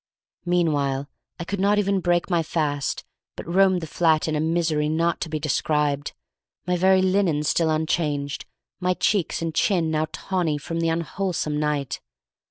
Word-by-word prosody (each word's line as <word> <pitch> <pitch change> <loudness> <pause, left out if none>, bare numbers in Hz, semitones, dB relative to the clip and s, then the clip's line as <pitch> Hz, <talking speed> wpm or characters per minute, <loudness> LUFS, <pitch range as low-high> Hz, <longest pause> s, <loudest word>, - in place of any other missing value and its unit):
Meanwhile 145 -6 +1 0.3
I - - -3
could 200 +3 -4
not 200 +2 +3
even 200 -1 +2
break 175 -1 +1
my 175 -3 +2
fast, 150 -3 -2 0.3
but - - -7
roamed 185 +1 +3
the - - -4
flat 160 0 +2
in 155 - 0
a - - 0
misery 160 -2 +1
not 165 +2 0
to 165 - -3
be 155 0 -2
described, 150 -1 0 0.5
my 180 0 +1
very 190 +1 +4
linen 185 -5 +2
still 160 +2 +2
unchanged, 155 -2 -1 0.3
my 180 0 +1
cheeks 185 -5 0
and 165 -1 -2
chin 170 -2 +1
now 155 0 0
tawny 175 -6 -1
from 165 +3 -4
the 165 0 +1
unwholesome 165 -1 -2
night. 150 -3 -1
165 Hz, 165 wpm, -24 LUFS, 150-180 Hz, 0.5 s, very